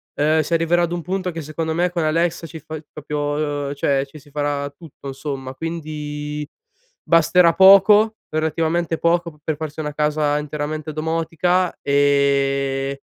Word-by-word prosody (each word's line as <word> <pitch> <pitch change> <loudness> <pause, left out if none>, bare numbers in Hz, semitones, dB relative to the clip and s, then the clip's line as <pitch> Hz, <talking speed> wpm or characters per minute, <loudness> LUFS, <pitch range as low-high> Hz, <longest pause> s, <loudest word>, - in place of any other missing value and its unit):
uhm, 155 +2 +2
si 155 - -4
arriverà 165 +1 +2
ad 170 - -1
un 175 - -3
punto 185 +2 -3
che 165 -1 -6
secondo 160 +2 -3
me 175 +2 +1
con 175 -2 -1
Alexa 165 +1 0
ci 160 -1 -9
fa 155 - -8
il 155 -1 -9
proprio 145 0 -2
uhm, 140 - -3
cioè 140 -1 0
ci 140 - -13
si 145 0 -20
farà 145 -1 -2
tutto 140 -2 -11
insomma, 135 -1 -5
quindi 150 -1 -5 0.6
basterà 165 +1 +5
poco, 200 +3 +7
relativamente 160 +1 0
poco, 170 0 +1
p 150 - -22
per 155 -1 -2
farsi 155 0 -6
una 150 -1 -4
casa 150 0 +1
interamente 150 +1 -4
domotica. 165 +3 0
E 140 -1 +1
155 Hz, 160 wpm, -21 LUFS, 145-165 Hz, 0.6 s, poco